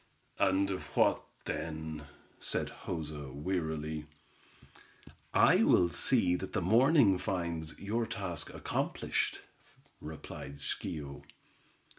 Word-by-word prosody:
"And 95 +1 +3 0.3
what, - - +4 0.2
then?" 80 -1 -4 0.3
said - - -2 0.2
Joza, 75 -5 -4
wearily. 80 -1 -2 1.2
"I - - +6
will 90 -1 +5
see 95 -8 +3
that 95 - -6
the 105 - +2
morning 115 - +5
finds 85 -4 -2
your 110 +3 -1
task 95 -3 -4
accomplished," - - -1 0.6
replied 75 -2 -8
Schio. 70 -1 -4
85 Hz, 90 wpm, -32 LUFS, 75-95 Hz, 1.2 s, I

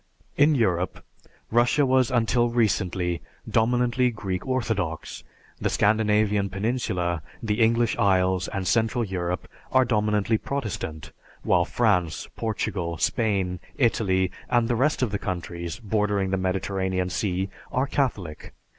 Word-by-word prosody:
In 150 +1 +4
Europe, 95 -7 0 0.5
Russia 120 +5 +3
was 130 -1 +3
until 120 -1 +2
recently 95 -6 0 0.3
dominantly 120 +3 +2
Greek 100 -3 -4
Orthodox; 110 -11 -2 0.4
the - - 0
Scandinavian 105 -1 +2
peninsula, 95 -5 -1 0.2
the 105 +1 0
English 115 0 +3
Isles, 95 -1 +2
and 95 -1 -3
Central 115 +4 +2
Europe 90 -3 -3 0.2
are 130 0 +4
dominantly 105 -1 +1
Protestant, 85 - -4 0.3
while 85 -1 +3
France, 95 -8 +1
Portugal, 95 -6 -2
Spain, 95 -3 0 0.2
Italy, 95 -7 +2 0.2
and 120 -1 +3
the 120 - +1
rest 135 +3 +1
of 115 - 0
the 100 - -1
countries 85 -1 -4
bordering 105 -3 0
the - - +2
Mediterranean 95 0 -1
Sea 95 -1 -1 0.2
are 130 +2 +1
Catholic. 105 - -3
105 Hz, 120 wpm, -25 LUFS, 90-120 Hz, 0.5 s, In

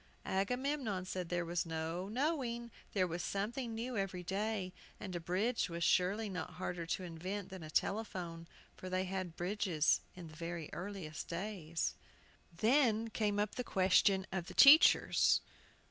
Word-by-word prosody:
Agamemnon 230 0 -1
said 180 -2 -4
there 175 -1 -1
was 170 +1 -1
no 165 +3 -3
knowing. 240 -2 -1 0.2
There 190 -3 +3
was 170 0 -3
something 225 +4 -2
new 240 +2 -4
every 190 -3 -2
day, 195 0 -2 0.3
and 185 -3 -6
a - - -1
bridge 190 +9 0
was 170 0 -3
surely 190 +5 +2
not 180 -5 -5
harder 180 -2 -4
to 185 - -2
invent 185 +3 -5
than 190 -2 -7
a 155 - -8
telephone, 175 -3 -2 0.3
for 185 - -8
they 185 0 0
had 185 -2 -4
bridges 180 -4 +1
in 180 -2 -9
the 155 - -12
very 165 -1 -5
earliest 175 -4 -6
days. 170 -3 -3 0.6
Then 225 - +2
came 210 -2 0
up 210 0 0
the 250 - -3
question 190 -1 +3
of 180 -2 -3
the - - -9
teachers. 295 +4 +7
190 Hz, 155 wpm, -35 LUFS, 175-215 Hz, 0.6 s, teachers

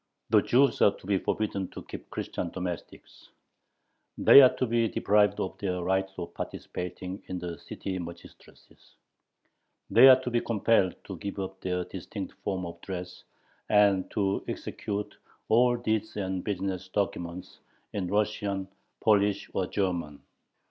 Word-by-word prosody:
The - - +6
Jews 135 +3 +3
are 100 - +5
to - - -16
be 100 -1 +1
forbidden 100 -3 -2
to - - -7
keep - - -10
Christian 85 - -4
domestics; 90 -2 -7 0.9
they 140 - +9
are 130 - +7
to - - 0
be 115 -1 +2
deprived 105 -1 +2
of 95 - -3
their 90 -3 -2
right 95 +1 +1
of 85 - -6
participating 90 +2 -6
in 95 - -4
the 85 -1 -6
city 95 -1 -5
magistracies; 85 0 -13 1.0
they 125 +4 +9
are 130 -1 +9
to 125 - -4
be 120 0 +2
compelled 105 -4 +2
to 95 - -7
give 100 +3 -5
up 95 -1 -5
their 90 -1 -1
distinct - - -7
form 95 -2 -2
of 85 0 -9
dress 90 -1 -7 0.5
and 100 -3 +4
to 100 -2 0
execute 105 -1 -4 0.3
all 120 +2 +4
deeds 110 -2 -2
and 95 -2 -2
business 95 -2 -3
documents 90 -2 -3 0.3
in 95 -3 -2
Russian, 100 -1 -1 0.3
Polish, 105 -2 +2
or 95 - 0
German. 85 -7 -2
95 Hz, 145 wpm, -28 LUFS, 90-105 Hz, 1.0 s, they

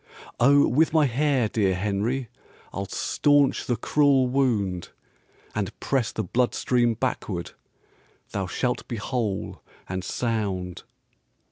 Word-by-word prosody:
"Oh, 140 +4 +6
with 155 +6 +2
my 155 -2 +5
hair, 135 -1 +1
dear 100 -3 +1
Henry, 105 +7 -1 0.5
I'll 100 0 -4
staunch 145 +4 +2
the 120 - +1
cruel 135 +2 +3
wound, 110 -9 0 0.6
And - - -3
press 130 -5 0
the 110 - -3
blood 120 +6 0
stream 120 -2 +2
backward; 105 -7 -3 0.8
Thou 95 -2 -2
shalt 125 +6 -2
be 120 - -4
whole 110 -3 -3 0.3
and 95 0 -4
sound." 95 -6 -2
120 Hz, 120 wpm, -25 LUFS, 100-135 Hz, 0.8 s, Oh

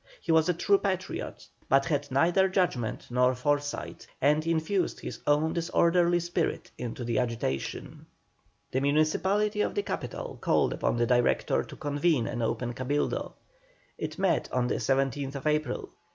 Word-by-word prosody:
He - - -2
was 160 +1 +4
a - - +4
true 200 +3 +3
patriot, 190 -2 -3 0.2
but 135 0 +4
had 145 -2 -1
neither 175 +8 +3
judgment 180 - -1
nor 125 +1 +3
foresight, 145 +3 -2
and 150 +3 +2
infused 165 +3 0
his - - -7
own 150 +2 +3
disorderly 170 +1 +3
spirit 175 0 -2
into 120 +1 -5
the 115 -1 0
agitation. 115 - -3 0.6
The 130 - 0
municipality 190 +9 +2
of - - -1
the 410 - 0
capital - - -5
called - - +2
upon - - 0
the 120 - +2
Director 120 0 +2
to - - -11
convene 145 -2 +1
an 120 - -3
open 120 +1 -1
Cabildo. 135 +4 -2 0.6
It - - -4
met 190 -2 +1
on 125 -1 +1
the - - 0
17th 135 +1 -1
April. 150 -4 -1
145 Hz, 150 wpm, -28 LUFS, 130-175 Hz, 0.6 s, was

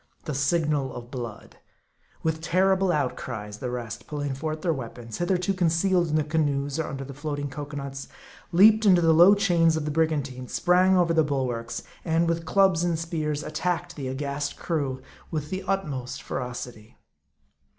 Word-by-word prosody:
The 150 - -3
signal 145 -1 0
of 120 0 -9
blood! 120 -5 -7 0.7
With 160 0 -1
terrible 190 +2 +2
outcries, 120 -8 -3
the 125 - -3
rest, 120 -1 -6
pull 150 -1 -4
ing 145 -1 -2
forth 155 +3 -4
their 170 -3 +2
weapons, 115 -4 -7
hitherto 180 +2 +1
concealed 175 0 +2
in 155 - -1
the 155 - +3
canoes, 145 -2 0
or 160 - -1
under 135 0 -5
the 140 +1 -8
floating 145 0 -4
cocoanuts, 140 -2 -6 0.4
leaped 215 +5 +6
into 185 -4 +6
the 165 -1 +5
low 175 +5 +8
chains 170 -5 +3
of 155 - -3
the 150 - -1
brigantine; 145 -5 -1
sprang 185 +4 +3
over 170 -2 +3
the 160 -1 +4
bulwarks; 125 -5 -2 0.2
and, 165 0 +1
with 165 0 -1
clubs 190 -1 +3
and 170 -2 +1
spears, 155 -3 -2
attacked 175 +2 -2
the 140 -3 -5
aghast 140 +2 -3
crew 135 -6 -2 0.3
with 150 -2 -4
the 190 0 -2
utmost 150 -11 -2
feroc 125 0 -4
ity. 110 -3 -15
155 Hz, 170 wpm, -26 LUFS, 135-170 Hz, 0.7 s, low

